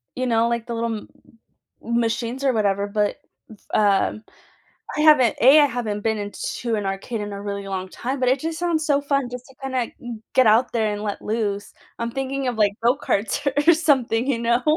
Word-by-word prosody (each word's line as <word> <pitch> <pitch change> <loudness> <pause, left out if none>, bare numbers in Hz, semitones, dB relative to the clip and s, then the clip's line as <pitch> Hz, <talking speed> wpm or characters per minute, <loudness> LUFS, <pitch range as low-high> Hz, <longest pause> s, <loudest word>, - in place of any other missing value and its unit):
you 255 - -2
know, 230 0 +2
like 235 0 -2
the 235 - -4
little 230 0 -1
m 210 - -8 0.8
m 235 +1 0
machines 235 +3 -2
or 270 - +3
whatever, 200 -2 +1
but, 205 0 0 0.6
uh, 200 -2 +3 0.8
I - - +1
haven't 300 -8 +5
a. 270 +6 +8
I - - +6
haven't 230 -6 -3
been 220 0 0
in 205 0 -5 0.3
to 235 -2 -1
an 205 -2 -3
arcade 195 +4 -3
in 205 0 -5
a 200 - -6
really 200 -1 -5
long 190 -1 -3
time, 260 +7 -4
but 255 - +1
it 265 +2 +2
just 325 0 -3
sounds 335 -3 0
so 285 -1 +2
fun 280 -3 0
just 250 0 -7
to 265 - -18
kinda 260 -3 -1
g 240 -5 -8
get 260 -1 +5
out 225 +4 +4
there 220 -2 +1
and 205 - -5
let 205 -1 -4
loose. 210 -2 -2 0.3
I'm 235 0 -2
thinking 270 +1 -3
of, 245 -2 -2
like, 205 -2 +3
go-karts 245 +1 0 0.2
or 340 - +9
something, 265 -7 +1
you 260 -4 0
know? 235 +1 +1
235 Hz, 210 wpm, -22 LUFS, 210-265 Hz, 0.8 s, or